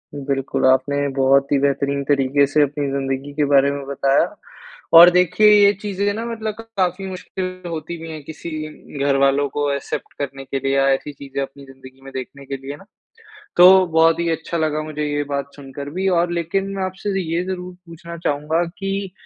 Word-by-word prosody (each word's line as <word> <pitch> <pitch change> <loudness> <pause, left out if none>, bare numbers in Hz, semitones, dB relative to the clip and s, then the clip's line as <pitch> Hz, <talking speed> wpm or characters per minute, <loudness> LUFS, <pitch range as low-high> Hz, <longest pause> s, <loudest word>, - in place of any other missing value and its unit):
बिल्कुल 135 -2 -2
आपने 140 +2 +2
बहुत 135 +1 +3
ही 145 - +4
बेहतरीन 140 0 0
तरीके 140 0 +2
से 150 - +4
अपनी 145 0 -2
ज़िंदगी 135 +1 -3
के 150 0 +1
बारे 140 0 +5
में 140 -1 -5
बताया 140 0 +2 0.7
और 175 +1 +11
देखिए 180 +4 +4
ये 205 -1 +6
चीज़ें 205 0 -1
न 225 +2 -4
मतलब 220 -2 -4
क - - -4 0.2
काफ़ी 185 +1 0
मुश्किल 185 0 -6
होती 165 +1 -5
भी 165 - -8
है 155 - -7
किसी 160 +3 -8 0.6
घरवालों 140 0 +2
को 145 +1 -1
एक्सेप्ट 140 - -5
करने 135 -1 -5
के 135 +1 -3
लिए 135 +1 -1
या 135 0 +3
ऐसी 145 +2 -4
चीज़ें 140 0 -6
अपनी 140 +1 -10
ज़िंदगी 135 0 -15
में 135 - -10
देखने 135 +1 -7
के 135 0 -5
लिए 140 +1 -5
न। - - -16 0.7
तो 185 +1 +8
बहुत 165 0 +3
ही 170 -1 0
अच्छा 165 +1 -3
लगा 155 -1 0
मुझे 150 -1 -4
ये 145 0 -1
बात 140 0 -3
सुनकर 140 0 -8
भी 190 - 0
और 175 0 0
लेकिन 175 +4 -1
मैं 190 - -2
आपसे 195 +1 -3
ये 170 +1 -2
ज़रूर 180 -1 -5
पूछना 170 +1 -9
चाहूँगा 150 +4 0 0.2
कि 195 -1 -3
145 Hz, 190 wpm, -20 LUFS, 140-180 Hz, 0.7 s, और